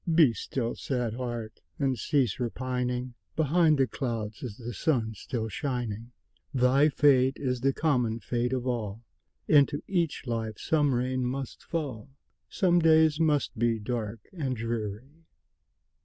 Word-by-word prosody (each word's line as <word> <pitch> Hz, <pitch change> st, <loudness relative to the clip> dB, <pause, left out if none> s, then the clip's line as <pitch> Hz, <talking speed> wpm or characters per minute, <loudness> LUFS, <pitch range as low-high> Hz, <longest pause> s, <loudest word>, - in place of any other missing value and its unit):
Be 160 Hz, -7 st, +6 dB
still, 115 Hz, +3 st, -3 dB
sad 125 Hz, -4 st, -2 dB
heart! 120 Hz, -3 st, -5 dB, 0.2 s
and 135 Hz, -2 st, +1 dB
cease 130 Hz, -5 st, 0 dB
repining; 125 Hz, 0 st, -2 dB, 0.2 s
Behind 160 Hz, 0 st, +3 dB
the 135 Hz, -, +4 dB
clouds 115 Hz, -5 st, -4 dB
is 115 Hz, -5 st, -6 dB
the 120 Hz, -1 st, -6 dB
sun 110 Hz, -, 0 dB
still 110 Hz, +2 st, -4 dB
shining; 120 Hz, -2 st, -3 dB, 0.4 s
Thy 130 Hz, +4 st, +4 dB
fate 135 Hz, -2 st, +4 dB
is 125 Hz, -3 st, -1 dB
the 135 Hz, +1 st, +3 dB
common 125 Hz, -7 st, +1 dB
fate 120 Hz, +1 st, -1 dB
of 130 Hz, -1 st, -1 dB
all, 115 Hz, -3 st, -3 dB, 0.4 s
Into 145 Hz, -1 st, +4 dB
each 170 Hz, -7 st, -1 dB
life 115 Hz, -3 st, -3 dB
some 145 Hz, -4 st, +2 dB
rain 130 Hz, +1 st, 0 dB
must 130 Hz, +1 st, -4 dB
fall, 140 Hz, -7 st, -4 dB, 0.4 s
Some 175 Hz, -2 st, +3 dB
days 160 Hz, -1 st, +5 dB
must 150 Hz, -7 st, +1 dB
be 115 Hz, -1 st, +2 dB
dark 110 Hz, -1 st, -4 dB
and 140 Hz, -8 st, -2 dB
dreary. 115 Hz, +6 st, -4 dB
125 Hz, 140 wpm, -28 LUFS, 115-145 Hz, 0.4 s, Be